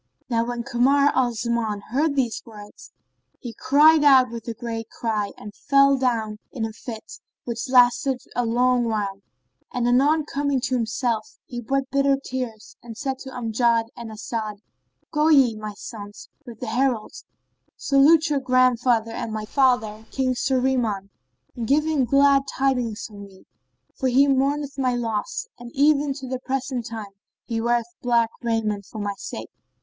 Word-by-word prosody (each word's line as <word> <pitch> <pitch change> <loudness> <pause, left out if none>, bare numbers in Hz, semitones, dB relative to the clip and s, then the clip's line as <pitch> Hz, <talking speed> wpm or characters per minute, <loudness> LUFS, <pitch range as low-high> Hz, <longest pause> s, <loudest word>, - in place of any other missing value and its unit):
No 230 -1 +2
vv - - -6
when 240 -1 -3
Kamar 275 +3 +3
al 255 -2 +2
Zaman 225 -2 -2
heard 285 +3 +1
these 250 -5 0
words, 210 -2 -13 0.5
he 240 -3 -7
cried 300 +4 +5
out 260 -4 +6
with 235 0 -8
a 230 - -4
great 225 -1 -5
cry 215 -3 -2
and 210 - -10
fell 275 +2 +4
down 230 -5 -1
in 230 -4 -3
a 220 - -6
fainting 230 +1 -7
fit 325 - -13 0.3
which 235 +1 -4
lasted 250 +1 +4 0.2
a 245 - +1
long 245 +1 +2
while; 205 -3 -2 0.5
and 245 -1 -1
anon 285 +5 +3
coming 285 -2 -1
to 260 +1 -2
himself 240 - -1
he 240 -1 -6
wept 275 +3 -2
bitter 275 0 +3
tears 250 -5 -6
and 230 -2 -10
said 265 -1 -3
to 265 - -8
Amjad 230 -2 0
and 235 -1 -8
As'ad, 215 0 -4 0.6
"Go 300 +1 +2
ye, 270 -7 +5
O - - -9
my 210 -1 -6
sons, 205 -2 -10 0.2
with 230 -2 -11
the - - -3
herald, 240 -2 0 0.6
salute 300 +4 +4
your 285 - +2
grandfather 250 -3 +2
and 230 - -4
my 215 0 -4
father, 225 -4 +1
King 260 -1 0
Shahriman 250 -6 0 0.4
and 230 -2 -4
give 300 +4 +3
him 305 -5 +1
glad 275 +2 +4
tidings 250 -5 -1
of 210 -3 -14
me, 200 -2 -13 0.5
for 265 - -2
he 270 +3 +4
mourneth 280 +1 0
my 255 -2 +1
loss 235 - -2
and 240 0 -9
even 290 0 +3
to 265 -2 -7
the 255 0 -3
present 260 -2 -3
time 220 -4 -7 0.3
he 225 -1 -2
weareth 235 0 0
black 235 -2 +2
raiment 215 -4 -1
for - - -10
my 205 -1 -2
sake." - - -7
245 Hz, 170 wpm, -23 LUFS, 225-270 Hz, 0.6 s, out